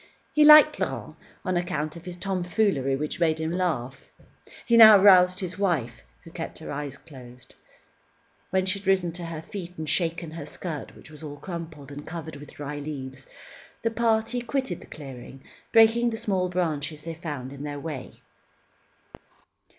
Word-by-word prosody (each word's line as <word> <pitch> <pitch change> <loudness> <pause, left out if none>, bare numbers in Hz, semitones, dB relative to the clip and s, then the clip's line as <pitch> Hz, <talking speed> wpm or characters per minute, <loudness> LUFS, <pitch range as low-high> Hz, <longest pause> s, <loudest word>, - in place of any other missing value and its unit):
He 305 - +5
liked 305 0 +8
Laurent - - -3 0.3
on 185 -1 0
account 165 -3 -2
of 170 - -11
his 180 -1 -6
tomfoolery, 180 - 0
which 150 +4 -4
made 160 -2 +2
him 160 0 -2
laugh. 145 -8 -2 0.6
He 235 - +3
now 220 -2 +10
roused 185 -2 +6
his 185 +1 -5
wife, 155 - -1 0.2
who - - -13
kept - - -6
her - - -8
eyes 140 -1 -5
closed. 125 -5 -14 1.0
When 190 0 +1
she 190 +1 0
had 195 - -13
risen 185 -3 +2
to 175 +1 -7
her 165 -1 -6
feet, 180 -2 -8
and 155 -1 -5
shaken 170 0 -1
her 160 -2 -7
skirt, 155 -2 -7
which - - -15
was 150 - -12
all 145 -2 -7
crumpled, 160 -5 -8
and 145 +1 -8
covered 160 -2 -7
with 145 +1 -12
dry 145 0 -5
leaves, 135 -2 -7 0.6
the 230 - +1
party 225 +1 +1
quitted 240 -6 -2
the - - -13
clearing, 135 -2 -10 0.3
breaking 225 +1 +5
the 225 - -4
small 190 -5 0
branches 155 -4 -2
they 165 - -5
found 145 -5 -6
in 140 - -9
their 145 -1 -5
way. 145 -4 -7
165 Hz, 170 wpm, -26 LUFS, 145-190 Hz, 1.0 s, now